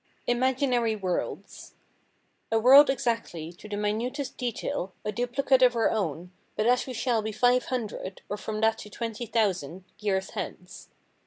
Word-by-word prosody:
Imaginary 245 -2 +1
Worlds 185 -4 -4 0.8
A 225 - +3
world 265 +6 +8
exactly, 230 -10 -2
to 210 +4 -13
the 205 - -3
minutest 235 +7 -2
detail, 230 -6 -3
a 210 - 0
duplicate 245 +4 +1
of 250 -1 +5
our 230 - +2
own, 180 -4 -2 0.2
but 215 - 0
as 245 +2 +3
we 255 - -5
shall 235 -1 0
be 220 +1 -3
five 245 +3 +3
hundred, 215 -6 -4
or 205 - -3
from 215 +1 -5
that 225 0 +2
to 210 - -9
twenty 230 +2 -5
thousand, 190 -6 -1 0.2
years 190 -2 -1
hence. 180 0 -7
225 Hz, 155 wpm, -27 LUFS, 205-245 Hz, 0.8 s, world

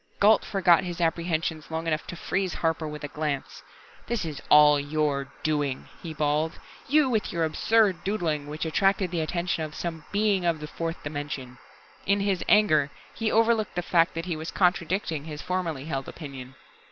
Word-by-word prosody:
Gault 210 +2 +5
forgot 180 -4 +3
his 175 -1 -5
apprehensions 165 -1 -1
long 160 0 -3
enough 155 -1 -1
to - - -6
freeze 190 +2 -2
Harper 160 -1 -1
with 150 0 -7
a - - -2
glance. 150 -2 -4 0.5
"This 235 -6 -1
is 150 -4 -5
all 150 -1 +7
your 145 -1 -1 0.2
doing," 145 -4 -1
he 165 - -6
bawled. 150 +1 0 0.3
"You 295 0 +4
with 225 -5 0
your 170 -1 0
absurd 195 +4 +2
doodling, 165 -8 -1
which 150 +2 -4
attracted 190 +2 +2
the 170 -2 -1
attention 170 0 -1
of 155 0 -6
some 165 -3 -5
Being 205 -2 +2
of 170 -2 +1
the 150 - -6
fourth 165 +2 -5
dimension!" 145 -4 -5 0.5
In 200 +1 +3
his 195 -3 0
anger, 155 -9 +5 0.2
he 225 -1 -1
overlooked 225 -2 +2
the 175 - -1
fact 170 0 +2
that 165 0 -3
he 175 -3 -2
was 160 +1 -5
contradicting 175 -4 0
his 150 -2 -7
formerly 170 -7 -2
held 135 -4 -3
opinion. 135 -4 -9
165 Hz, 175 wpm, -26 LUFS, 150-185 Hz, 0.5 s, all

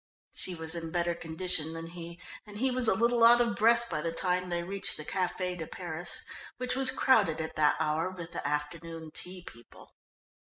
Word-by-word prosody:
She 185 - -3
was 160 0 -3
in 165 -1 -4
better 175 0 0
condition 165 -1 -1
than 165 0 -6
he, 170 0 -9 0.3
and 205 0 -9
he 260 +4 +1
was 250 -2 +2
a - - +4
little 235 +1 +3
out 235 +1 +8
of 235 -3 +2
breath 235 +2 +4
by 150 - -2
the 165 +1 -1
time 180 +1 0
they 170 0 -1
reached 195 +2 -1
the 155 - -7
Café 180 0 -1
de 165 -3 -6
Paris, 175 +8 -4 0.3
which 250 0 -1
was 265 0 +6
crowded 220 -11 +3
at 160 0 -4
that 150 -1 +4
hour 160 +3 +1
with 175 -2 -8
the - - -3
afternoon 160 +2 -4
tea 180 +2 -8
people. 120 -8 -14
175 Hz, 200 wpm, -30 LUFS, 160-205 Hz, 0.3 s, out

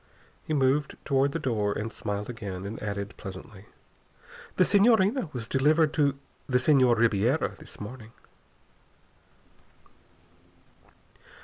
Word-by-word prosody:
He 155 - -3
moved 140 +1 +1
toward 140 0 +2
the 165 - -2
door, 110 -9 -1
and 110 +1 -4
smiled 105 0 -4
again, 100 -6 -6
and 105 +3 -6
added 100 -1 -4
pleasantly: 95 +1 -10 0.9
"The 185 - +4
Senhorina 215 - +3
was 120 -5 -6
delivered 150 +4 +2
to 145 -2 +1 0.3
the 125 - +3
Senhor 130 -2 +4
Ribiera 115 +4 +1
this - - -11
morning." 110 +1 -9
125 Hz, 110 wpm, -27 LUFS, 105-150 Hz, 0.9 s, The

